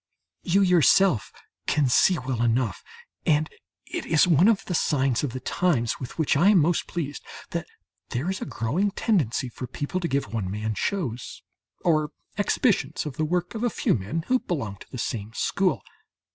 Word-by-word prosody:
You 195 +3 +3
yourself 180 - +4 0.4
can 150 -3 +2
see 175 +8 +4
well 130 -2 -3
enough 120 -3 0 0.4
and 155 0 +2 0.4
it - - -4
is 160 +1 +4
one 170 +2 +5
of 225 -3 +2
the 180 - -3
signs 135 -6 +1
of 140 - -1
the 130 - -5
times 130 -4 0
with 125 - -7
which 160 -3 +2
I 170 +8 +5
am 210 - +6
most 165 +1 +2
pleased 145 -5 -4 0.3
that - - -3 0.4
there 125 +7 -2
is 190 0 -2
a - - -2
growing 140 - 0
tendency 190 - 0
for 125 +1 -7
people 145 +8 -3
to 175 - -1
give 140 -5 -2
one 105 -5 -2
man 105 +2 -2
shows, 125 - -3 0.4
or 155 -3 +2 0.3
exhibitions 210 - +1
of 145 -4 -6
the 155 - +1
work 175 +4 -1
of 225 0 -4
a 240 - +3
few - - +1
men 125 +11 -2
who 255 0 +2
belong 110 - -4
to - - -15
the 130 - -7
same 110 -2 -4
school. 195 -2 0
150 Hz, 185 wpm, -25 LUFS, 125-180 Hz, 0.4 s, am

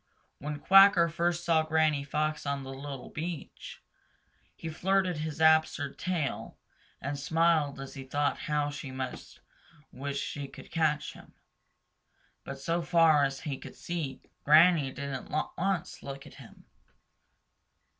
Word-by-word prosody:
When 150 +1 -4
Quacker 195 0 +7
first 170 +1 -1
saw 165 -2 +4
Granny 155 -2 +1
Fox 150 +1 -2
on 140 -1 -2
the 135 0 -7
little 135 -1 -8
beach, 165 0 -7 0.7
he 165 - -8
flirted 185 +2 +1
his 155 0 -4
absurd 160 -2 +4
little - - -21
tail 175 -7 -3 0.4
and 140 +1 -4
smiled 160 -2 +2
as 135 -1 -7
he 135 - -7
thought 145 +2 -1
how 150 -1 +1
she 140 -1 -7
must 130 -1 -7 0.5
wish 140 +1 -4
she 145 -1 -4
could - - -13
catch 150 -2 0
him. - - -16 1.1
But 135 - -7
so 165 +5 -1
far 165 -3 +4
as 135 -1 -4
he 140 -3 -4
could - - -11
see, 160 -7 -5 0.2
Granny 155 -2 +6
didn't 135 -1 -6 0.2
once 185 -1 -2
look 140 0 -8
at - - -13
him. - - -16
150 Hz, 140 wpm, -29 LUFS, 140-165 Hz, 1.1 s, Quacker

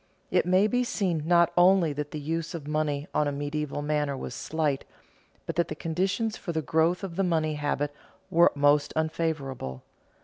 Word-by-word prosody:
It - - +2
may 185 +3 +4
be 245 +3 +1
seen 175 -10 -1
not 170 -1 +4
only 175 -3 +5
that 145 0 -4
the 150 - -5
use 165 +3 -3
of 150 -3 -7
money 150 -1 -1
on 150 - +2
a - - 0
medieval 145 0 -3
manor 145 -2 0
was 125 - -6
slight, 150 -1 -1 0.6
but 165 - -4
that 170 - +2
the 155 - -5
conditions 190 +8 -1
for 175 - -5
the 160 -1 -2
growth 165 +5 +1
of 180 -3 -5
the 195 - +2
money 160 -3 +1
habit 145 0 -1 0.4
were 170 +1 +6
most 145 0 +3
unfavorable. 155 - -2
155 Hz, 180 wpm, -27 LUFS, 145-170 Hz, 0.6 s, were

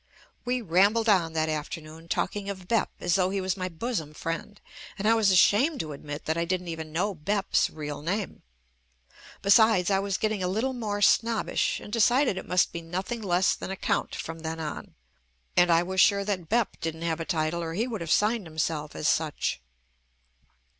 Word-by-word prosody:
We 250 0 -1
rambled 200 +5 +3
on 175 -6 +3
that 160 0 0
after 155 +2 -3
noon 160 +1 -13
talking 200 +3 -2
of 190 -2 -7
"Bep" 230 +2 +1
as 175 - 0
though 185 -1 +3
he 195 +1 -1
was 185 -1 -1
my 185 -1 -3
bosom 165 -4 -4
friend, 165 +7 -5 0.4
and 205 +1 -1
I 225 - +6
was 220 -3 +3
ashamed 210 - +4
to 155 -2 -6
admit 145 +1 -7
that 160 +1 0
I - - +1
didn't 180 0 -2
even 160 -1 -6
know 190 +6 0
"Bep's" 195 +5 0
real 150 -2 -6
name. 190 +6 -3 1.0
Be 200 - +2
sides, 215 -3 +5
I 195 - +3
was 195 -1 -1
getting 215 -2 -1
a 180 - 0
little 225 +8 -1
more 210 -4 -2
snobbish 230 +1 +2
and 210 - -10
decided 240 +1 +3
it 190 - -6
jmust 180 0 +2
be 170 - -5
nothing 185 +8 -4
less 185 -2 +2
than - - -6
a 190 - -3
count - - -1
JUST - - -4
ME - - -10
from 165 0 -7
then 160 0 -5
on, 155 -2 -6 0.6
and 175 0 +5
I 170 0 +4
was 190 +1 +1
sure 200 0 +4
that 185 -5 -3
"Bep" 235 -1 0
didn't 165 0 -4
have 165 -1 -1
a - - -2
title 160 0 -1
or 165 -1 -4
he 220 +5 0
would 225 -6 -5
have 165 - -5
signed 210 +1 +2
himself 155 -1 -3
as 150 - -1
such. 155 - 0
185 Hz, 210 wpm, -27 LUFS, 165-210 Hz, 1.0 s, I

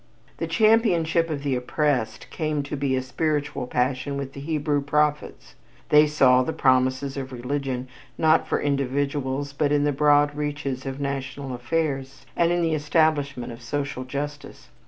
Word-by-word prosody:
The 165 - -3
championship 170 -4 +3
of 145 -3 -3
the 140 -2 0
oppressed 125 -3 -1
came 155 -2 -1
to 145 - -5
be 135 -2 0
a 130 - -1
spiritual 145 -1 -2
passion 130 +3 -1
with 135 -1 -5
the - - -8
Hebrew 150 -1 -1
prophets. 150 - -1 0.4
They 150 0 +6
saw 130 -4 +4
the 145 +5 -2
promises 130 +1 +2
of 135 -1 -5
religion, 130 0 -3 0.3
not 160 0 +3
for - - 0
individuals 140 0 -1
but 145 0 0
in 145 -1 +3
the 145 - +2
broad 145 +1 +3
reaches 145 -3 -3
of 135 +1 -5
national 135 -1 -4
affairs 135 +1 -2
and 170 0 +2
in 175 0 +1
the 165 -1 +1
establishment 145 -5 +1
of 115 - -12
social 140 +1 -3
justice. 145 +3 -6
140 Hz, 155 wpm, -24 LUFS, 130-150 Hz, 0.4 s, They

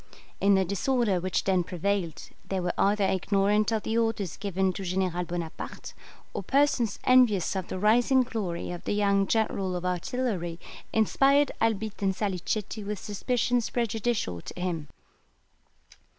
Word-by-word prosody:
In 200 0 +4
the 190 0 +3
disorder 200 +1 +1
which 185 +1 -1
then 185 -2 +2
prevailed 180 -1 -2 0.2
they 190 - 0
were 175 -1 -1
either 205 +1 +2
ignorant 200 +3 +2
of 220 -2 0
the 225 +1 0
orders 225 -6 -1
given 190 -2 -1
to 195 - -6
General 180 -1 -1
Bonaparte, 170 -2 -6 0.4
or - - -3
persons 275 -6 +2
envious 245 -8 +4
of 190 -2 -3
the - - -4
rising 240 +6 +4
glory 195 -10 -4
of 175 - -7
the - - 0
young 200 -1 +2
general 195 -4 0
of 180 0 -4
artillery 180 -2 -2 0.3
inspired 275 +6 +3
Albitte 220 -2 0
and 190 -1 +1
Salicetti 205 +2 -2
with 210 +1 -3
suspicions 240 +4 -1
prejudicial 225 - -1
to - - -9
him. 170 -4 -2
200 Hz, 145 wpm, -27 LUFS, 180-225 Hz, 0.4 s, In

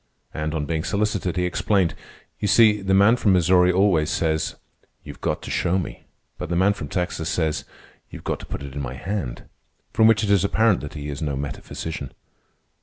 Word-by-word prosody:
And, 75 +1 -3
on 75 -2 -1
being 80 0 -2
solicited, 100 -3 -1
he 90 - +1
explained. 90 0 +1 0.5
"You 105 - -1
see, 105 -1 +5
the 95 0 +1
man 100 +5 +5
from 105 -5 +3
Missouri 90 0 +4
always 90 -5 +3
says, 80 -1 0 0.5
'You've - - -11
got - - -2
to - - -6
show 90 +2 +1
me.' 90 - -5 0.3
But - - -5
the 85 - -1
man 95 +3 +4
from 80 -7 -7
Texas 90 0 -2
says, 80 -3 -1 0.4
'You've - - -10
got - - -2
to - - -10
put - - -6
it 70 -1 -8
in 70 - -4
my 65 -1 -5
hand.' 80 -6 -4 0.5
From 110 - +5
which 110 -1 +4
it 100 - +1
is 100 -2 +4
apparent 110 +1 +3
that 75 +1 -8
he 75 -1 -5
is 70 +1 -5
no 75 -3 -1
metaphysician." 70 +3 -5
90 Hz, 200 wpm, -23 LUFS, 75-100 Hz, 0.5 s, see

